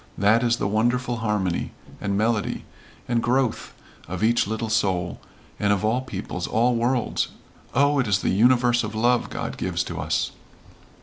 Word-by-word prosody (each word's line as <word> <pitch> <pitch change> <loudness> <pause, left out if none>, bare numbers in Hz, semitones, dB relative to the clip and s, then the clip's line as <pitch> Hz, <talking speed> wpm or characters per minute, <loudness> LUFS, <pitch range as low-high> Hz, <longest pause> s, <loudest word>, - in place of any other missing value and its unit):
That 105 +4 +4
is 120 -1 +2
the - - -1
wonderful 120 +3 +1
harmony 105 -5 -1 0.3
and 100 -1 -1
melody 110 0 0 0.4
and 120 -1 +1
growth 125 0 0 0.4
of 95 +3 -4
each 115 -2 +3
little 110 +1 -2
soul 95 -5 0 0.4
and 105 0 +2
of 105 +1 +1
all 115 +4 +1
peoples, 130 - -5
all 120 +3 +2
worlds, 120 +1 0 0.5
Oh, 145 +1 +4
it 125 - +1
is 100 -2 +3
the - - -1
universe 120 +3 +4
of 105 0 -5
love 120 +2 +2
God - - -5
gives - - -1
to - - -6
us." - - -1
115 Hz, 165 wpm, -24 LUFS, 105-120 Hz, 0.5 s, That